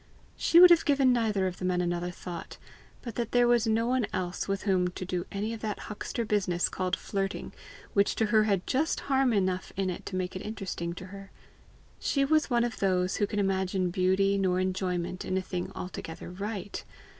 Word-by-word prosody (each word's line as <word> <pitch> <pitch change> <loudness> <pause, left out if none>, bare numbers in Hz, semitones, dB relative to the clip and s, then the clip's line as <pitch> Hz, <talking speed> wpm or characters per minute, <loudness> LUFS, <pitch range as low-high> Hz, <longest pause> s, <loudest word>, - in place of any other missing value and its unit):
She 335 - +5
would 360 0 +10
have 340 - +6
given 275 -3 +4
neither 215 -5 +1
of 185 -1 -3
tie 185 - -3
men 180 -1 +1
another 175 0 -1
thought, 175 -1 -8 0.5
but 235 - -5
that 235 -2 -2
there 245 0 +5
was 240 -1 +3
no 225 +1 +2
one 250 -3 +1
else 180 -2 -3
with 195 -1 -2
whom 185 -3 +2
to 180 +1 -5
do 180 0 -3
any 210 +3 -2
of 225 - -6
that 215 -1 -3
huckster 230 +2 -3
business 185 -5 +1
called 185 -1 -1
flirting, 195 -1 -3 0.4
which 200 0 +3
to 220 - +2
her 215 -1 +5
had 200 -4 +1
just 295 +5 0
harm 270 -2 +2
enough 185 -3 0
in 190 -1 0
it 175 - -7
to 185 - -4
make 185 0 -2
it 185 - -4
interesting 195 -5 -4
to 180 - -8
her. 195 -1 -9 0.7
She 275 -1 +1
was 310 +1 +2
one 240 -2 +3
of 240 -1 -3
those 185 -1 +1
who 205 - +1
can 210 - -4
imagine 190 -2 0
beauty 195 +2 +2
nor 185 -1 +2
enjoyment 185 -1 -2
in 185 - -1
a - - +3
thing 180 -1 -4
altogether 175 -2 -7
right. 200 +1 -5
195 Hz, 205 wpm, -29 LUFS, 185-225 Hz, 0.7 s, would